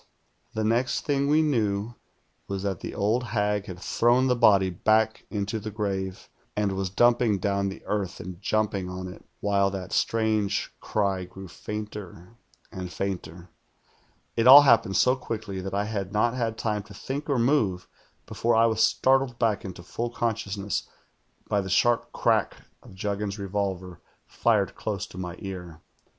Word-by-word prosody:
The 110 Hz, -, 0 dB
next 115 Hz, +4 st, +1 dB
thing 140 Hz, -2 st, +1 dB
we 155 Hz, +2 st, +4 dB
knew 110 Hz, -6 st, 0 dB, 0.5 s
was 100 Hz, -1 st, -4 dB
tliMt 95 Hz, -3 st, -2 dB
the -, -, -6 dB
old 110 Hz, +5 st, +1 dB
hag 105 Hz, -3 st, -1 dB
had 90 Hz, -, -7 dB
thrown 120 Hz, +6 st, +3 dB
the 125 Hz, -1 st, +3 dB
body 100 Hz, -6 st, +5 dB
back 110 Hz, +4 st, +1 dB
into 105 Hz, +1 st, -2 dB
the 110 Hz, +1 st, -5 dB
grave, 95 Hz, -3 st, -3 dB, 0.3 s
and 105 Hz, -1 st, +1 dB
was 95 Hz, 0 st, -2 dB
dumping 120 Hz, +1 st, +3 dB
down 100 Hz, +1 st, 0 dB
the 95 Hz, -, -9 dB
earth 100 Hz, -4 st, -2 dB
and 90 Hz, 0 st, -8 dB
jumping 105 Hz, -3 st, 0 dB
on 90 Hz, 0 st, -5 dB
it, 90 Hz, -, -11 dB, 0.2 s
wliile 100 Hz, -1 st, +2 dB
that 95 Hz, -2 st, -5 dB
strange 110 Hz, -3 st, 0 dB
cry 100 Hz, -3 st, -1 dB
grew 95 Hz, +1 st, -10 dB
fainter 105 Hz, -1 st, -7 dB, 0.4 s
and 90 Hz, -3 st, -6 dB
fainter. 90 Hz, -2 st, -5 dB, 0.8 s
1 115 Hz, -, +1 dB
1 -, -, +6 dB
all 140 Hz, +3 st, +12 dB
happened 115 Hz, -7 st, +4 dB
so 125 Hz, +1 st, +4 dB
quickly 110 Hz, -6 st, -5 dB
that 95 Hz, +1 st, -4 dB
I 100 Hz, +1 st, 0 dB
had 100 Hz, -3 st, -3 dB
not 115 Hz, +3 st, +2 dB
had 115 Hz, -3 st, -2 dB
time 105 Hz, -1 st, -1 dB
to 105 Hz, -, -13 dB
Lliink 140 Hz, +8 st, -5 dB
or 140 Hz, -, +2 dB
move 115 Hz, -8 st, +1 dB, 0.4 s
before 115 Hz, +2 st, 0 dB
I 115 Hz, +1 st, +5 dB
was 110 Hz, -1 st, +1 dB
startled 135 Hz, -2 st, +2 dB
back 110 Hz, -4 st, +1 dB
into 90 Hz, -2 st, -8 dB
full 120 Hz, +6 st, -3 dB
consciousness 105 Hz, -4 st, -2 dB, 0.6 s
by 100 Hz, -, +1 dB
the 95 Hz, -, -6 dB
sharp 120 Hz, +5 st, +2 dB
crack -, -, +1 dB, 0.3 s
of -, -, -15 dB
Juggins's 100 Hz, +1 st, -3 dB
revolver 95 Hz, -3 st, -3 dB, 0.2 s
fired 105 Hz, -4 st, +1 dB
close 105 Hz, -2 st, -3 dB
to 90 Hz, -, -11 dB
my 90 Hz, -1 st, -5 dB
ear. 90 Hz, -4 st, -7 dB
105 Hz, 165 wpm, -26 LUFS, 95-115 Hz, 0.8 s, all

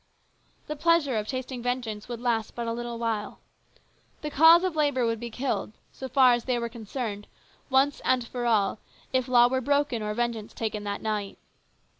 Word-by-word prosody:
The 300 Hz, -, -4 dB
pleasure 325 Hz, -4 st, +2 dB
of 210 Hz, 0 st, -2 dB
tasting 255 Hz, 0 st, -4 dB
vengeance 240 Hz, -3 st, -3 dB
would 240 Hz, -2 st, -5 dB
last 235 Hz, -3 st, -1 dB
but 235 Hz, -, -3 dB
a 230 Hz, -, -2 dB
little 240 Hz, 0 st, -5 dB
while. 225 Hz, -3 st, -2 dB, 0.9 s
The 300 Hz, -, -3 dB
cause 325 Hz, +4 st, +7 dB
of 370 Hz, -3 st, -1 dB
labour 285 Hz, -5 st, +2 dB
would 230 Hz, -1 st, -1 dB
be 240 Hz, +1 st, -5 dB
killed, 245 Hz, -2 st, -3 dB, 0.2 s
so 265 Hz, -, -7 dB
far 255 Hz, -1 st, +6 dB
as 240 Hz, -1 st, -1 dB
they 250 Hz, -2 st, 0 dB
were 235 Hz, 0 st, -3 dB
concerned, 220 Hz, -2 st, -5 dB, 0.4 s
once 270 Hz, +2 st, +2 dB
and 255 Hz, -2 st, +2 dB
for 245 Hz, 0 st, -3 dB
all, 215 Hz, -2 st, +2 dB, 0.3 s
if 255 Hz, -1 st, +1 dB
law 240 Hz, -1 st, +6 dB
were 260 Hz, +1 st, 0 dB
broken 285 Hz, -3 st, +1 dB
or 210 Hz, 0 st, -3 dB
vengeance 235 Hz, -2 st, -3 dB
taken 215 Hz, -2 st, -3 dB
that 200 Hz, 0 st, -4 dB
night. 210 Hz, -2 st, -3 dB
240 Hz, 185 wpm, -27 LUFS, 225-265 Hz, 0.9 s, cause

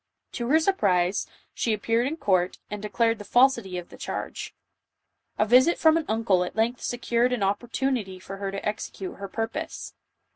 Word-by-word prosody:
To 240 Hz, -2 st, -3 dB
their 315 Hz, +3 st, +5 dB
surprise, 200 Hz, -, +1 dB, 0.3 s
she 230 Hz, -, 0 dB
appeared 230 Hz, +4 st, +1 dB
in 315 Hz, +3 st, -3 dB
court, 185 Hz, -, +1 dB
and 210 Hz, -1 st, -4 dB
declared 225 Hz, +1 st, +1 dB
the -, -, -7 dB
falsity 235 Hz, -6 st, +3 dB
of 175 Hz, -, -7 dB
the -, -, -13 dB
charge. -, -, -5 dB, 0.8 s
A 215 Hz, -, +3 dB
visit 255 Hz, +9 st, +5 dB
from 320 Hz, -1 st, +5 dB
an 330 Hz, -2 st, 0 dB
uncle 215 Hz, -5 st, +2 dB
at 180 Hz, -, -6 dB
length 230 Hz, +3 st, 0 dB
secured 240 Hz, 0 st, 0 dB
an 250 Hz, -4 st, -1 dB
opportu 235 Hz, +7 st, 0 dB
nity 195 Hz, -7 st, -3 dB
for 195 Hz, +1 st, -8 dB
her 195 Hz, 0 st, -3 dB
to 195 Hz, +1 st, -4 dB
execute 210 Hz, -2 st, -5 dB
her 200 Hz, -, -6 dB
purpose. 235 Hz, +11 st, -4 dB
225 Hz, 180 wpm, -26 LUFS, 195-250 Hz, 0.8 s, their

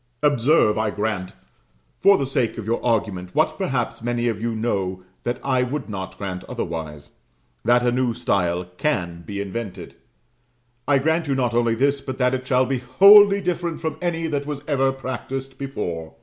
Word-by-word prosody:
Observe, 140 Hz, -5 st, +3 dB
I 110 Hz, -1 st, +1 dB
grant, 105 Hz, -3 st, -3 dB, 0.7 s
for 200 Hz, 0 st, +6 dB
the 140 Hz, -, -1 dB
sake 130 Hz, -3 st, -1 dB
of 115 Hz, -, -5 dB
your 115 Hz, +2 st, -1 dB
argument, 100 Hz, -6 st, -1 dB
what 155 Hz, 0 st, +2 dB
perhaps 120 Hz, -10 st, -2 dB
many 120 Hz, 0 st, -1 dB
of 110 Hz, -2 st, -2 dB
you 115 Hz, 0 st, -1 dB
know 95 Hz, -5 st, -2 dB, 0.2 s
that 120 Hz, +1 st, -2 dB
I 130 Hz, -2 st, +1 dB
would 130 Hz, +1 st, -3 dB
not 95 Hz, -2 st, -6 dB
grant 95 Hz, -2 st, -5 dB
otherwise 80 Hz, -10 st, -5 dB, 0.5 s
that 120 Hz, +1 st, +3 dB
a 120 Hz, -, +3 dB
new 125 Hz, -1 st, 0 dB
style 90 Hz, -7 st, 0 dB
can 85 Hz, -, -1 dB
be 100 Hz, +3 st, -6 dB
invented. 100 Hz, -3 st, -5 dB, 0.9 s
I 145 Hz, -, +4 dB
grant 160 Hz, +3 st, +1 dB
you 140 Hz, -, +1 dB
not 125 Hz, -3 st, 0 dB
only 115 Hz, -1 st, +2 dB
this, 140 Hz, +3 st, +1 dB
but 130 Hz, -1 st, -6 dB
that 125 Hz, -1 st, +2 dB
it 130 Hz, 0 st, -3 dB
shall 130 Hz, 0 st, +3 dB
be 130 Hz, 0 st, -1 dB
wholly 200 Hz, +10 st, +7 dB
different 175 Hz, -2 st, -2 dB
from 160 Hz, -, -3 dB
any 170 Hz, -2 st, -1 dB
that 145 Hz, -3 st, -2 dB
was 145 Hz, -1 st, -5 dB
ever 135 Hz, -3 st, +2 dB
practised 135 Hz, 0 st, -6 dB
before. 85 Hz, -, -5 dB
125 Hz, 180 wpm, -22 LUFS, 105-140 Hz, 0.9 s, wholly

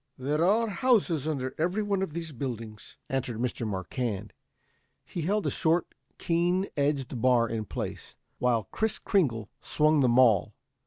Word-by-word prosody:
"There 145 Hz, +5 st, 0 dB
are 220 Hz, +6 st, +3 dB
houses 190 Hz, -, +2 dB
under 135 Hz, -4 st, -2 dB
every 180 Hz, +6 st, +1 dB
one 200 Hz, -2 st, 0 dB
of 190 Hz, -6 st, -3 dB
these 165 Hz, -1 st, -4 dB
buildings," 115 Hz, -5 st, -6 dB
answered 130 Hz, -4 st, -2 dB
Mr. 120 Hz, -1 st, -2 dB
Marquand. 100 Hz, +2 st, -3 dB, 0.7 s
He 175 Hz, -, -5 dB
held 200 Hz, +6 st, 0 dB
a -, -, +1 dB
short, 165 Hz, 0 st, +1 dB, 0.2 s
keen 175 Hz, +3 st, +1 dB
edged 140 Hz, -4 st, -1 dB
bar 125 Hz, -2 st, +4 dB
in 110 Hz, -2 st, -3 dB
place, -, -, -6 dB, 0.2 s
while 120 Hz, -3 st, +2 dB
Kris 220 Hz, 0 st, 0 dB
Kringle 120 Hz, -, 0 dB
swung 155 Hz, 0 st, +3 dB
the 130 Hz, -3 st, +4 dB
maul. 120 Hz, -5 st, +4 dB
140 Hz, 150 wpm, -28 LUFS, 120-175 Hz, 0.7 s, bar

